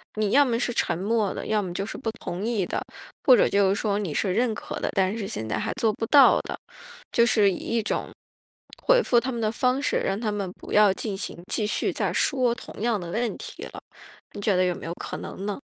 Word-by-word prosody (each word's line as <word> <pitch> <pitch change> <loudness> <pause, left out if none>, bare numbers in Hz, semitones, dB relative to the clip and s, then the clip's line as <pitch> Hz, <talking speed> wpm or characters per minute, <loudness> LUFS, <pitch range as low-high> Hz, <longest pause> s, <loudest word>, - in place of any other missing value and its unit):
你 215 -2 0
要 285 - +6
么 235 -4 0
是 245 - -1
沉 170 - 0
默 205 +1 0
的， - - -6
要 215 -1 +1
么 185 -3 -5
就 195 - -2
是 - - -7
不 235 - -3
同 185 -5 -6
意 220 -4 0
的， - - -3 0.4
或 255 -4 +8
者 - - +4
就 200 -1 +3
是 195 - +2
说 205 0 0
你 190 -7 -3
是 190 -3 +1
认 230 +2 +1
可 - - -6
的， - - -1
但 190 +1 +2
是 205 -4 -4
现 110 - -5
在 110 - -1
还 - - -2
做 230 -4 +1
不 225 - -3
到 285 +1 +7
的。 - - -6 0.6
就 235 - +5
是 210 -4 +4
以 180 - -3
一 230 -1 -1
种 - - -3 0.7
回 - - +5
复 240 - +3
他 260 +2 -3
们 235 - -4
的 215 -1 +1
方 250 +3 +1
式， - - +1
让 195 +2 -1
他 220 -2 -1
们 200 -3 -3
不 - - -11
要 210 -2 +6
进 200 0 -4
行 190 -3 -6
继 215 - 0
续 210 - 0
再 - - -1
说 255 -4 +2
同 240 - -10
样 230 -3 +1
的 175 -1 -6
问 230 +4 -1
题 - - -9
了， - - -9 0.5
你 - - -6
觉 205 -1 +2
得 185 - +3
有 180 - 0
没 - - -9
有 165 - -3
可 - - -6
能 195 - -7
呢？ 205 - -3
215 Hz, 275 characters per minute, -25 LUFS, 195-235 Hz, 0.7 s, 或